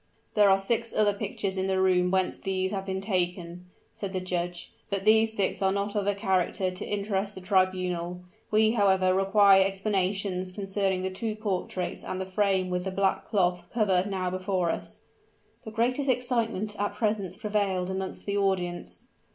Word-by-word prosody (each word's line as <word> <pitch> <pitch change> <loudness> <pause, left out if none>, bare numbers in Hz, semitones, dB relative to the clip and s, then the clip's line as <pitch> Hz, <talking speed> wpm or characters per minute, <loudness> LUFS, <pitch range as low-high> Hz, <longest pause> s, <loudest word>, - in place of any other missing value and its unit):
"There 210 -3 +5
are 195 - +6
six 230 +4 -1
other 210 -1 +3
pictures 195 -1 -3
in 190 - 0
the 190 0 +1
room 180 -1 +3
whence 190 0 +1
these 190 0 -2
have 195 -1 -4
been 190 0 -2
taken," 180 -3 -2 0.3
said 200 -3 -6
the 185 - 0
judge; 175 -1 -4 0.2
"but 200 -1 -2
these 220 +1 +4
six 195 -1 0
are 190 0 +3
not 200 +2 -2
of 205 -1 0
a 205 - +2
character 190 -2 0
to 185 - -6
interest 200 0 -2
the 190 - -8
tribunal. 185 -2 0 0.3
We 215 +1 +4
however 190 -4 +3
require 195 0 +5
explanations 195 -1 -1
concerning 195 -1 -1
the 190 - -2
two 215 +3 -3
portraits 190 -4 -3
and 185 - -4
the 190 - -2
frame 190 -1 +1
with 180 0 -1
the 190 - -2
black 195 0 0
cloth 180 -4 +1
cover 195 -6 +2
now 185 -2 -2
before 185 -2 0
us." - - -6 0.6
The - - -5
greatest 250 +5 0
excitement 230 -5 0
at 205 0 -1
present 210 -5 -1
prevailed 200 -4 0
amongst 190 0 -5
the 200 0 -1
audience. 175 - -2
195 Hz, 175 wpm, -27 LUFS, 185-205 Hz, 0.6 s, are